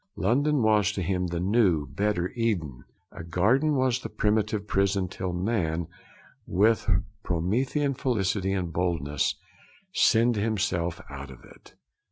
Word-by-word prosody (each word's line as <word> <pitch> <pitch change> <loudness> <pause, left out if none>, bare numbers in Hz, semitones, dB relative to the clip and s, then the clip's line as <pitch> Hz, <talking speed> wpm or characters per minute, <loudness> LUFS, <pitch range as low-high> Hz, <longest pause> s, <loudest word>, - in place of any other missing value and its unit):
London 135 - +1
was 105 -2 +3
to 95 - -3
him 90 0 -1
the 85 0 -3
new, 95 -5 +2
better 95 +4 -1
Eden. 90 - -2 0.3
'A - - -9
garden 120 - +2
was 130 -2 +1
the - - -7
primitive 105 -1 0
prison 100 -1 +1
till 95 0 -4
man 90 -3 -1 0.6
with 105 +5 +2 0.3
Promethean 125 - 0
felicity 100 -7 0
and 90 -4 -2
boldness 80 -5 0 0.6
sinned 115 0 +3
himself 90 -6 -1
out 70 -1 -8
of 65 - -13
it. - - -18
100 Hz, 130 wpm, -27 LUFS, 85-115 Hz, 0.6 s, was